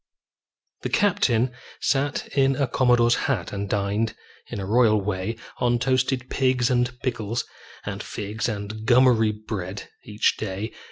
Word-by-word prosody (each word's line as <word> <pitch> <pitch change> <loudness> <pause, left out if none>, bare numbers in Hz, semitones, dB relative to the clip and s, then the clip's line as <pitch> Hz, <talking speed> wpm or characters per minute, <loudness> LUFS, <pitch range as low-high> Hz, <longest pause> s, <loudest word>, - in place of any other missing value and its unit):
The - - -3
captain 130 - +2 0.3
sat 140 0 0
in 135 -1 +2
a 140 - +1
commodore's 120 -2 +3 0.2
hat - - -1
And 100 0 -3
dined, 105 +2 0 0.3
in - - -5
a 95 - -3
royal 110 0 +4
way, 100 +2 -2 0.2
On 120 -1 +2
toasted 130 0 0
pigs 130 -2 +2
and 125 0 0
pickles 115 -2 -2 0.4
and - - -4
figs 105 +3 -3
And 110 +1 -5
gummery 120 -3 +5
bread, 105 -3 -6
each 105 -4 +1
day. 105 +1 -4
115 Hz, 135 wpm, -24 LUFS, 105-125 Hz, 0.4 s, gummery